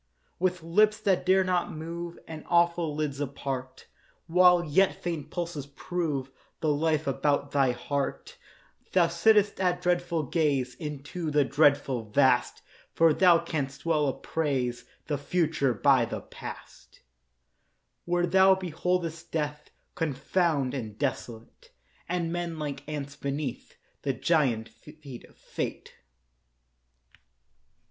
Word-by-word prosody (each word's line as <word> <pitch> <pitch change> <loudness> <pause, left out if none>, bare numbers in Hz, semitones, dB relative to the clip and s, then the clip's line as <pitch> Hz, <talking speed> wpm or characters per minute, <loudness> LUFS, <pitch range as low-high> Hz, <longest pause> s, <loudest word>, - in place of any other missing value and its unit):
With 180 -1 0
lips 210 +6 +3
that 190 -3 +1
dare 190 +1 +5
not 180 -1 0
move 170 +2 -6
And 160 -2 -8
awful 170 -2 +2
lids 150 -2 -2
apart, 135 -2 -5 0.4
While 180 +1 +5
yet 185 +6 +3
faint 160 -4 -4
pulses 170 -5 -4
prove 145 -3 -3 0.3
The 155 -2 +1
life 155 +1 +1
about 140 +1 0
thy 135 -2 +3
heart, 140 +3 -4 0.6
Thou 180 -2 +5
sitt'st 205 +5 +3
at 180 -1 +1
dreadful 175 -2 0
gaze 140 -4 0
Into 150 +4 -5
the 145 -1 +3
dreadful 135 -5 +2
Vast: - - +2 0.3
For 165 -1 +5
thou 175 +1 +6
canst 140 -4 -4
well 155 -3 +2
appraise 135 -4 -2 0.2
The 145 -3 -2
future 150 -5 0
by 130 +1 +4
the - - -5
past, - - -11 1.0
Where 175 0 +1
thou 190 +2 +5
beholdest 175 -2 -2
Death 150 -2 -3 0.2
Confound 155 -2 0
and 110 -6 -5
desolate, 115 -4 -5 0.4
And 170 -1 -1
men 175 -2 -3
like 145 -3 -4
ants 140 -2 -5
beneath 140 -2 -5 0.2
The 135 - -1
giant 130 -8 +1
feet 135 +3 -12
of - - -23
Fate. - - -5
155 Hz, 120 wpm, -28 LUFS, 140-175 Hz, 1.0 s, thou